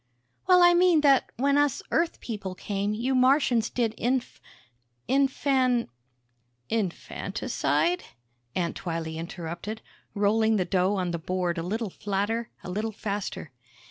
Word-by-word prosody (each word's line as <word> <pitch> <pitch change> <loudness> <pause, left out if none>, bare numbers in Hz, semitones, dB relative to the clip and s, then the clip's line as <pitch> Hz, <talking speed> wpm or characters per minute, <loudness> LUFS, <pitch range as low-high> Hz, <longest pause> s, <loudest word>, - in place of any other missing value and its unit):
"Well, 360 -1 +7
I 350 0 +7
mean, 350 -2 +5
that 275 -2 +4
when 280 +3 +3
us 290 -3 +1
Earth 335 +1 0
people 200 -5 -5
came, 205 +2 -2
you 245 +5 -1
Martians 255 -3 +3
did 230 -3 0
inf... 250 0 -1 0.7
infan 265 -2 +2 0.4
..." 120 0 -46
"Infanticide?" 225 - -1 0.5
Aunt 170 -2 -1
Twylee 165 -2 -4
interrupted, 170 +5 -6 0.3
rolling 220 +2 +3
the 185 -3 +1
dough 185 +2 +1
on 180 -3 -1
the 170 - -3
board 180 0 -1
a - - -1
little 210 +4 -3
flatter, 205 +5 -2
a - - -7
little 215 +4 -2
faster. 200 -8 -4
215 Hz, 135 wpm, -27 LUFS, 180-260 Hz, 0.7 s, Well